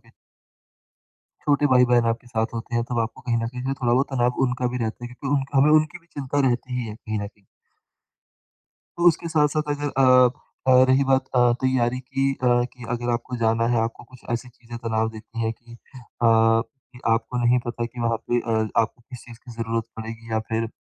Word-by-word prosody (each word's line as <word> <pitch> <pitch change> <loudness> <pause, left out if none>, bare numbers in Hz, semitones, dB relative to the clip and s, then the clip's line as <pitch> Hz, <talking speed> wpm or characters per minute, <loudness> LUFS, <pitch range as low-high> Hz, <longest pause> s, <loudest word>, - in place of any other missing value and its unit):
के - - -26 1.4
छोटे 145 0 +3
भाई-बहन 125 -1 +5
आपके 120 - -10
साथ 115 -2 -1
होते 115 +1 -5
हैं 120 - +2
तो 120 0 -3
आपको 115 0 -4
कहीं 120 -2 -1
न - - -1
कहीं 125 +1 -7
जो 135 - 0
थोड़ा 120 -1 +2
बहुत 130 +3 +2
तनाव 125 -1 +1
उनका 125 0 -1
भी - - -1
रहता 110 +2 -5
है - - -5
क्योंकि 135 +2 -2
उनका 135 0 -1
हमें 145 +3 +5
उनकी 155 +2 +3
भी 170 - -30
चिंता 140 0 -1
रहती 125 +1 -2
ही 120 - -4
है 105 - -6
कहीं 110 -1 -4
न 100 - -3
कहीं। 100 0 -17 1.5
तो 175 0 +2
उसके 170 0 0
साथ-साथ 155 -1 +2
अगर 145 0 -2 0.2
अ 130 -1 +7 0.4
अ, 130 0 +7
रही 130 +1 +4
बात 130 0 +2
अ, 120 -1 +5
तैयारी 125 -1 +1
की 135 +1 -1
अ, 130 -2 -1 0.2
कि 125 -2 -12
अगर 120 0 -2
आपको 120 +1 -3
जाना 115 0 +1
है 115 - +2
आपको 115 +1 -4
कुछ 125 +1 -17
ऐसी 120 +2 -2
चीज़ें 120 -1 -11
तनाव 110 -1 -1
देती 115 +1 -9
हैं 115 0 0
कि 120 +1 -17
अ, - - -11 0.5
कि 115 +3 +2
आपको 115 +2 -1
नहीं 120 +1 +4
पता 120 0 -3
कि 120 +1 -7
वहाँ 115 -1 +1
पे 120 - +2
अ, 110 -2 0
आपको 115 +2 -3
किस 125 - -8
चीज़ 120 -1 -12
की 125 - -10
ज़रूरत 115 0 -2
पड़ेगी 115 0 -8
या 110 - +2
फिर 115 0 -1
120 Hz, 215 wpm, -24 LUFS, 115-130 Hz, 1.5 s, अ